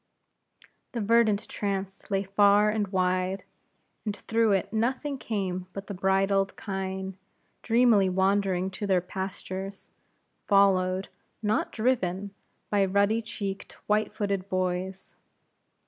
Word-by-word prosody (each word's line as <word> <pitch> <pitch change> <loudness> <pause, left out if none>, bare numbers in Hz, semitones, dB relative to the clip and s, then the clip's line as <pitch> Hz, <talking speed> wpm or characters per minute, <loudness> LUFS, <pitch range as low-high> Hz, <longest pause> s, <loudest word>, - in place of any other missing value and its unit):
The 235 - -2
verdant 215 -1 +3
trance 195 -1 -4
lay 195 -1 +1
far 205 +1 +4
and 210 -1 0
wide; 185 0 0 0.6
and 210 -2 -2
through 225 0 +1
it 195 +2 -1
nothing 260 +5 -1
came 185 -5 -3
but 195 0 -6
the 200 - -6
brindled 195 +1 +1
kine, 190 -1 -4 0.4
dreamily 230 -5 +4
wandering 190 0 +1
to 205 +2 -4
their 190 -2 +4
pastures, 190 +1 -6 0.6
followed, 190 -2 +3 0.3
not 210 +1 +1
driven, 200 -5 0 0.4
by 205 -1 +3
ruddy 200 +4 +2
cheeked, 200 -3 -5
white 210 +1 +1
footed 200 -2 -2
boys. 185 0 -2
195 Hz, 115 wpm, -27 LUFS, 190-210 Hz, 0.6 s, far